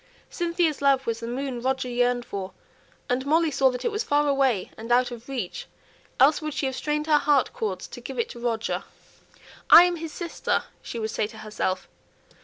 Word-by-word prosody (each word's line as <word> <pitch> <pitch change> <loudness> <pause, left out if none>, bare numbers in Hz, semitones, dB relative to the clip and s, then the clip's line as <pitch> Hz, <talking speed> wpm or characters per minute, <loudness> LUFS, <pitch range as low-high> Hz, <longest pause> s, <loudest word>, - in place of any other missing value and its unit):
Cynthia's 335 -4 0
love 275 -1 +3
was 230 -1 -2
the 230 - -6
moon 255 0 -3
Roger 260 0 -1
yearned 245 0 +1
for; 190 -3 -6 0.5
and 250 +1 0
Molly 315 +3 +2
saw 270 -1 +4
that 250 -1 -5
it 470 - +1
was 420 +2 -1
far 295 -4 +2
away 270 -8 +1
and 230 +2 -7
out 245 +1 +3
of 240 +2 -10
reach, 245 -10 -4 0.5
else 290 +5 +5
would 305 -1 -4
she 300 - -1
have 265 -1 -2
strained 300 +2 -1
her 305 -2 +4
heart 285 - +2
cords 460 -3 -3
to - - -9
give - - -7
it 465 -1 -1
to 240 - -9
Roger. 230 -2 -2 0.9
"I 340 - +11
am 355 -1 +1
his 325 -1 -6
sister," 340 +1 -2 0.2
she - - -7
would 220 -1 -2
say 210 - -1
to 220 +1 -13
herself. 210 -4 -3
265 Hz, 205 wpm, -25 LUFS, 240-305 Hz, 0.9 s, I